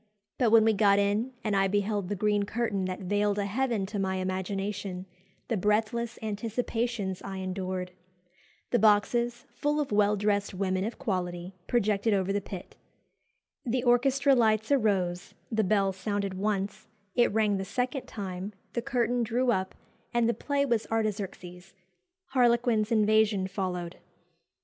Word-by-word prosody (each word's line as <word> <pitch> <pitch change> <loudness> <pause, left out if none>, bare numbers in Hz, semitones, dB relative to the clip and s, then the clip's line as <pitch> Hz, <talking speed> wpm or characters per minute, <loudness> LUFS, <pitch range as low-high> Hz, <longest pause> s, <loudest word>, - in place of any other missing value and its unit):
But 245 -4 +4
when 220 0 +6
we 225 - +4
got 200 -1 +4
in, 205 +5 +1
and 210 -2 0
I 195 0 +3
beheld 205 -1 -1
the 205 - -1
green 210 +1 +1
curtain 205 -2 -1
that 185 0 -4
veiled 205 +2 +1
a 200 - 0
heaven 225 -1 0
to 205 +1 -4
my 190 -1 0
imagination, 190 +1 -3 0.4
the 230 - 0
breathless 220 +4 0
anticipations 220 -2 -2
I 195 -1 -6
endured! 185 -1 -3 0.8
The 240 - +3
boxes, 235 +3 +2
full 295 +1 0
of 290 -5 -2
well 205 0 +3
dressed 200 -1 0
women 185 0 0
of 225 - -4
quality, 180 -6 -3
projected 215 -2 +2
over 195 0 0
the 205 - 0
pit. 185 -2 -9 0.9
The 245 +1 -1
orchestra 270 +3 +4
lights 220 -1 +2
arose 195 -8 +1 0.2
the 220 -1 +2
bell 195 -1 +2
sounded 200 0 -2
once 200 0 -2 0.3
it 240 - +3
rang 210 -1 +2
the 190 - -2
second 250 +6 -2
time 195 -1 -5 0.2
the 235 - -1
curtain 245 0 0
drew 240 +2 +1
up, 190 -4 -1 0.4
and 235 -1 +3
the 235 - +2
play 280 +2 0
was 235 -5 0
'Artaxerxes;' 195 -4 -3 0.5
'Harlequin's 235 -4 +2
Invasion' 215 -2 +3
followed." 185 -3 -4
205 Hz, 150 wpm, -28 LUFS, 195-235 Hz, 0.9 s, when